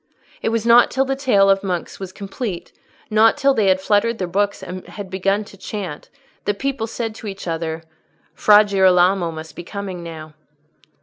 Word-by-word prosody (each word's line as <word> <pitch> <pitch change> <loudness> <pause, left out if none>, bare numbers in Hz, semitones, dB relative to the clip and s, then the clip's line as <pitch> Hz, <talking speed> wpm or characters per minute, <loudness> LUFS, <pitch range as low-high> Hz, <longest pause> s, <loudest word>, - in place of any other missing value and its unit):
It - - 0
was 225 0 -1
not 235 +1 +6
till 270 +1 +1
the 270 0 -1
tale 245 -8 +3
of 195 0 +3
monks 180 -3 -4
was 190 -2 -6
complete, 200 -1 -6 0.4
not 220 +4 +5
till 275 -1 +3
they 215 -6 +1
had 190 0 +4
fluttered 210 +4 +1
their 185 - -2
books 200 +3 -1
and 185 0 -7
had 200 -3 -8
begun 195 +2 0
to 200 - -15
chant, 190 -7 -6 0.4
that 205 -1 -1
people 270 -3 -2
said 225 0 -4
to 220 - -9
each 195 -2 -7
other, 165 -1 -3 0.5
"Fra 210 0 +6
Girolamo 185 -2 +3
must 160 0 -9
be 175 - -7
coming 195 -1 -6
now." 160 -2 -9
195 Hz, 185 wpm, -20 LUFS, 180-220 Hz, 0.5 s, not